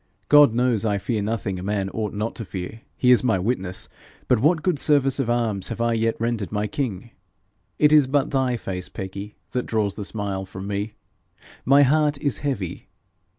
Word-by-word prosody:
God 145 -6 +7
knows 120 -3 +2
I 105 -2 +1
fear 110 +2 -2
nothing 100 -3 -2
a - - -7
man 100 0 -1
ought 110 -2 -3
not 105 +2 -3
to 115 - -4
fear 95 +3 -7 0.2
he 125 - +4
is 125 - +6
my 115 -6 +2
witness 95 -2 -2 0.4
but 125 - +3
what 155 +5 +2
good 175 -6 +1
service 140 -2 +3
of 130 -4 0
arms 110 -5 0
have - - -5
I 115 0 +1
yet 115 0 +1
rendered 115 -3 -2
my 105 0 -1
king? 115 -2 -4 0.7
It 150 0 +4
is 150 -3 +6
but 140 0 +1
thy 130 -3 +1
face, 90 -4 -5
Peggy, 100 +2 -7 0.2
that 125 - -2
draws 105 -3 0
the 105 - -6
smile 100 -2 -3
from 95 0 -8
me. 100 +2 -3 0.7
My 140 +2 +6
heart 150 +1 +2
is 140 -2 -2
heavy. 130 - -4
115 Hz, 195 wpm, -23 LUFS, 100-130 Hz, 0.7 s, God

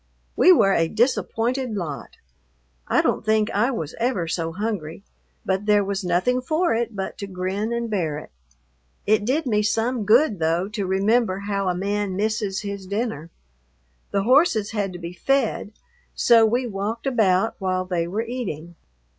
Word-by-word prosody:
We 370 - +6
were 195 - +5
a 165 -2 +2
disappointed 240 +2 0
lot. 150 - -6 0.7
I - - +2
don't - - 0
think 215 0 +2
I 215 +5 +2
was 165 - -4
ever 230 -8 0
so 165 0 -2
hungry, 195 -3 -4 0.4
but 190 +2 -1
there 205 -1 +4
was 200 0 -3
nothing 185 +9 +1
for 315 +5 +1
it 235 -1 -2
but 190 -1 -5
to 200 - -5
grin 190 +4 -3
and 235 0 -2
bear 170 -9 -1
it. 150 - -10 0.7
It 210 0 +2
did 285 +6 0
me 210 -4 +2
some 225 +2 0
good, 220 - +4
though, 165 +3 +1
to 210 -3 -3
remember 195 +1 +1
how 200 -1 -1
a 180 - 0
man 200 +1 -2
misses 210 -1 -1
his 200 -2 -6
dinner. 200 -6 -3 0.8
The 200 -1 0
horses 250 - +3
had 205 -3 -2
to - - -6
be 170 0 -7
fed, 235 +1 0 0.4
so 230 -2 +5
we 245 +3 0
walked 215 +2 -4
about 220 -5 +2
while 185 -1 -1
they 175 -2 -1
were 210 +6 -2
eating. 205 - -5
205 Hz, 165 wpm, -23 LUFS, 185-230 Hz, 0.8 s, We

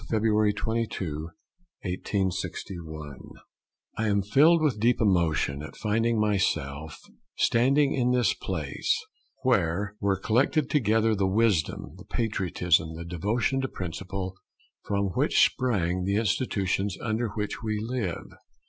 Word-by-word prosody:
February 110 -1 +3
22, 100 -8 -3 0.5
1861 90 -5 -4 0.8
I 110 - +1
am 100 -1 +2
filled 150 - +5
with 130 -9 +1
deep 120 +3 +3
emotion 85 -8 +1
at 75 - -9
finding 115 +1 +1
myself 80 -8 -1 0.4
standing 135 +4 +3
in 125 -2 +1
this 125 -2 +3
place, 80 -7 -2 0.4
where 100 +6 +1
were 100 -1 +1
collected 130 +7 +1
together 110 -5 +3
the 100 -2 +1
wisdom, 100 -5 +1
the - - -13
patriotism, 90 -7 0
the 85 +1 -7
devotion 105 +10 0
to 130 - -1
principle, 95 -1 -5 0.5
from 100 -1 0
which 90 - +4
sprang 95 -8 0
the 100 +2 0
institutions 100 -3 0
under 115 +1 -1
which 105 -2 -3
we 110 -1 -2
live. 110 -5 -3
100 Hz, 120 wpm, -27 LUFS, 90-115 Hz, 0.8 s, filled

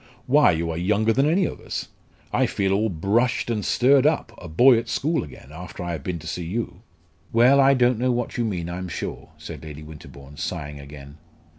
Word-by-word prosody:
"Why, 145 +3 +5
you 85 -1 0
are 80 - -4
younger 105 +5 +2
than 135 +5 +2
any 185 +3 +2
of - - -5
us! - - -5 0.4
I - - +3
feel 95 -1 0
all 110 +3 +1
brushed 105 +8 0
and 105 -3 -1
stirred 135 +2 +4
up 150 -7 0
a 90 - -9
boy 120 +10 +5
at 115 - -7
school 160 +3 0
again 65 -1 -12
after 90 +3 -8
I 85 - -3
have 80 -5 -5
been 90 +2 -3
to 80 - -12
see 90 - -4
you!" 110 +8 -4 0.5
"Well, 125 +4 +5
I 135 0 +5
don't 125 -2 +3
know 125 +1 +2
what 120 0 -2
you 120 - 0
mean, 90 -7 -2
I'm 90 +1 -5
sure," - - -6
said - - -9
Lady 75 -1 -9
Winterbourne, 75 -2 -12
sighing 75 -4 -5
again. 70 +1 -12
100 Hz, 210 wpm, -23 LUFS, 80-125 Hz, 0.5 s, Why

